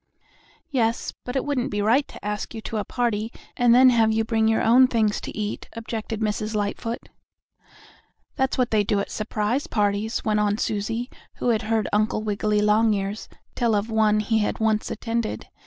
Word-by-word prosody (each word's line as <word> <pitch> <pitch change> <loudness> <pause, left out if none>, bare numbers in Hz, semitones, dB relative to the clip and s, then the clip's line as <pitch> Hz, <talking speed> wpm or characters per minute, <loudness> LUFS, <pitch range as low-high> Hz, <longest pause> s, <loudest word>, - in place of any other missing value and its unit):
"Yes, 230 -4 0
but 250 - -5
it 265 - 0
wouldn't 280 -3 -1
be 205 - -2
right 235 +7 +3
to - - -12
ask 210 +3 -4
you 220 - -5
to 220 - -4
a 210 - -1
party 230 -2 -1 0.2
and 240 -1 +4
then 255 0 +7
have 225 -2 +3
you 220 0 +1
bring 220 0 +1
your 220 0 +2
own 250 +3 +6
things 220 -4 +1
to - - -7
eat," 210 -1 -4
objected 225 -1 -5
Mrs. 215 0 -1
Lightfoot. 210 +3 -3 1.3
"That's 265 -1 0
what 250 -2 +1
they 215 -2 +3
do 205 0 +1
at 200 - -4
surprise 215 +4 -1
parties," 210 +1 -1
went 210 -1 +2
on 205 0 +1
Susie, 225 +4 -2 0.2
who - - -1
had 225 -2 +2
heard 220 -1 0
Uncle 215 +1 +1
Wiggily 210 0 0
Longears 210 -1 +1 0.2
tell 235 -3 +1
of 205 +2 -1
one 215 -1 +3
he 215 0 +1
once 220 -1 +1
attended. 230 -1 -3
220 Hz, 180 wpm, -24 LUFS, 210-235 Hz, 1.3 s, then